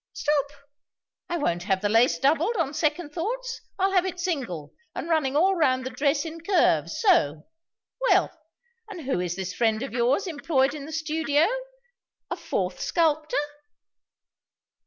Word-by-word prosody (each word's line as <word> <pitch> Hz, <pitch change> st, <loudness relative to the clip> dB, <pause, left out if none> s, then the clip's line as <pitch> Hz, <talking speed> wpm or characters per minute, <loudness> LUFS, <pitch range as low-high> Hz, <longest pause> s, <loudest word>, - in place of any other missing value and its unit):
"Stop! 290 Hz, -2 st, +1 dB, 0.8 s
I 345 Hz, -, -1 dB
won't 175 Hz, -, 0 dB
have 195 Hz, -2 st, +1 dB
the 205 Hz, -, +1 dB
lace 225 Hz, +4 st, +4 dB
doubled, 315 Hz, -, +2 dB
on 310 Hz, -5 st, 0 dB
second 310 Hz, +1 st, -1 dB
thoughts. 470 Hz, +9 st, -3 dB, 0.2 s
I'll 385 Hz, +1 st, +2 dB
have 370 Hz, -2 st, +3 dB
it 370 Hz, -2 st, -4 dB
single, 250 Hz, -, -3 dB, 0.2 s
and -, -, -4 dB
running 305 Hz, -5 st, +1 dB
all 380 Hz, +6 st, +4 dB
round 260 Hz, -6 st, +2 dB
the 260 Hz, -, -4 dB
dress 285 Hz, +3 st, +1 dB
in 325 Hz, 0 st, -7 dB
curves 365 Hz, +2 st, +2 dB
so. 160 Hz, -, +3 dB, 0.6 s
Well, -, -, +4 dB, 0.6 s
and 375 Hz, -5 st, -7 dB
who 265 Hz, -, -1 dB
is 175 Hz, -1 st, -2 dB
this 185 Hz, -1 st, -4 dB
friend 225 Hz, 0 st, +1 dB
of 270 Hz, -, -6 dB
yours 250 Hz, +9 st, +2 dB
employed 285 Hz, -5 st, +1 dB
in 290 Hz, -2 st, -7 dB
the -, -, -8 dB
studio? 310 Hz, -1 st, +1 dB, 0.9 s
A -, -, 0 dB
fourth -, -, -3 dB
sculptor?" 310 Hz, -2 st, +1 dB
295 Hz, 155 wpm, -26 LUFS, 255-335 Hz, 0.9 s, lace